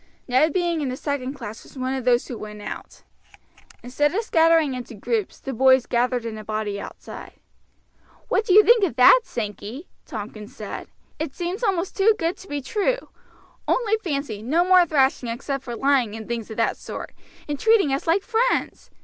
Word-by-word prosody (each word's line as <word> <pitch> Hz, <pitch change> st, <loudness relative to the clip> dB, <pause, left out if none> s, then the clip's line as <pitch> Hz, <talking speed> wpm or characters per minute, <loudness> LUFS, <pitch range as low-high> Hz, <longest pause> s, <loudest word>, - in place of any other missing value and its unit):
Ned 265 Hz, +5 st, +3 dB
being 345 Hz, -1 st, 0 dB
in 275 Hz, -, -1 dB
the 255 Hz, -, -4 dB
second 280 Hz, -2 st, -3 dB
class 230 Hz, -4 st, -8 dB
was -, -, -16 dB
one 260 Hz, 0 st, -2 dB
of 260 Hz, -2 st, -4 dB
those 245 Hz, -1 st, +3 dB
who 245 Hz, -, -5 dB
went 210 Hz, -1 st, -8 dB
out. -, -, -8 dB, 0.8 s
Instead 290 Hz, +6 st, 0 dB
of 445 Hz, -, 0 dB
scattering 325 Hz, -6 st, +3 dB
into 245 Hz, -2 st, -7 dB
groups, 220 Hz, -1 st, -2 dB
the 270 Hz, -, -5 dB
boys 260 Hz, +1 st, +5 dB
gathered 245 Hz, 0 st, 0 dB
in 220 Hz, -1 st, -5 dB
a -, -, -8 dB
body 215 Hz, -1 st, -3 dB
outside. -, -, -10 dB, 0.9 s
"What -, -, +1 dB
do 385 Hz, -, +1 dB
you 425 Hz, -, +9 dB
think 465 Hz, -1 st, +5 dB
of 330 Hz, -11 st, +1 dB
that, 255 Hz, -, +7 dB
Sankey?" 225 Hz, -, -6 dB, 0.2 s
Tompkins 210 Hz, -1 st, -8 dB
said. 210 Hz, -2 st, -7 dB, 0.3 s
"It 310 Hz, -3 st, -4 dB
seems 360 Hz, +6 st, -4 dB
almost 385 Hz, -4 st, 0 dB
too 425 Hz, +2 st, +4 dB
good 335 Hz, +2 st, -1 dB
to 385 Hz, -, -13 dB
be 290 Hz, -4 st, -4 dB
true. 435 Hz, -, -1 dB, 0.6 s
Only 450 Hz, -3 st, +2 dB
fancy, 280 Hz, -, -3 dB
no 315 Hz, +10 st, +2 dB
more 365 Hz, -1 st, +6 dB
thrashing 270 Hz, -5 st, +2 dB
except 270 Hz, +3 st, -4 dB
for 240 Hz, -2 st, -5 dB
lying 260 Hz, -4 st, +2 dB
and 220 Hz, -1 st, -8 dB
things 235 Hz, -2 st, -4 dB
of 220 Hz, -, -8 dB
that 230 Hz, -, +1 dB
sort, -, -, -7 dB, 0.4 s
and 290 Hz, -2 st, -3 dB
treating 435 Hz, -11 st, +4 dB
us 275 Hz, -, -2 dB
like 360 Hz, +4 st, +3 dB
friends! 470 Hz, +3 st, 0 dB
270 Hz, 190 wpm, -23 LUFS, 235-345 Hz, 0.9 s, you